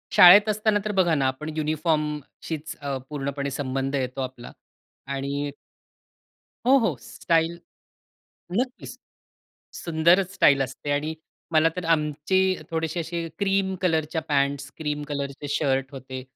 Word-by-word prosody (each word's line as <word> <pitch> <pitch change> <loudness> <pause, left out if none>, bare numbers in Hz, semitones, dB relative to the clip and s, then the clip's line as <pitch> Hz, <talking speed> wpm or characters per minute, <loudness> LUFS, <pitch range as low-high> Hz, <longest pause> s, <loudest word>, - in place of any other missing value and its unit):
शाळेत 200 +4 +9
असताना 215 0 +2
तर 210 - 0
बघा 185 -4 +3
ना 135 -3 +2
आपण 130 +4 -3
युनिफॉर्मशीच 155 0 -2
अ, 140 -1 -2
पूर्णपणे 140 -1 -3
संबंध 135 0 -2
येतो 130 0 -2
आपला 130 -2 -6 0.6
आणि 140 +1 -2 1.1
हो, 265 +2 +6
हो 220 - +1
स्टाईल 165 +8 0 1.0
नक्कीच 255 0 -4 0.8
सुंदरच 170 +3 +2
स्टाईल 140 -6 +5
असते 135 +2 -5
आणि 150 +2 -1 0.4
मला 160 0 +5
तर 180 - -3
आमचे 150 +4 0 0.3
थोडेसे 160 +1 -2
असे 165 0 -4
क्रीम 195 -1 +1
कलरच्या 160 -2 +1
पँट्स, 140 -1 0
क्रीम 150 -1 -3
कलरचे 140 0 -4
शर्ट 135 -2 0
होते 130 -1 -7
150 Hz, 120 wpm, -25 LUFS, 140-170 Hz, 1.1 s, शाळेत